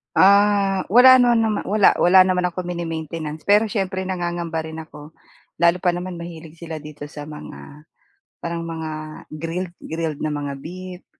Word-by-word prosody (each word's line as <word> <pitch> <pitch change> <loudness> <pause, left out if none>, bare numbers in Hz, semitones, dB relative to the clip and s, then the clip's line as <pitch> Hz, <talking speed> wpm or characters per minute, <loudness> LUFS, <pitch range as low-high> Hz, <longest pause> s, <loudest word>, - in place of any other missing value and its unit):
Ah, 200 0 +4
wala 255 +4 +8
nanaman 225 -3 +2
wala 205 0 +5
wala 180 +2 +6
naman 180 -1 +1
akong 180 +1 -5
mini-maintenance 160 -2 -5
pero 210 +2 +4
siyempre, 190 -3 -2
nangangamba 175 -3 -3
rin 160 0 -7
ako 155 -1 -11 0.5
lalo 170 +1 +4
pa 180 - +2
naman 180 +1 -5
mahilig 165 -1 -10
sila 165 -1 -7
dito 150 -1 -9
sa 150 0 -8
mga, 150 - -11 0.6
parang 170 0 -4
mga 160 -1 -5 0.4
grilled 165 +3 -5
grilled 160 -2 -4
na 155 -1 -2
mga 145 -1 -4
beef, 180 +5 -9
170 Hz, 150 wpm, -21 LUFS, 160-190 Hz, 0.6 s, wala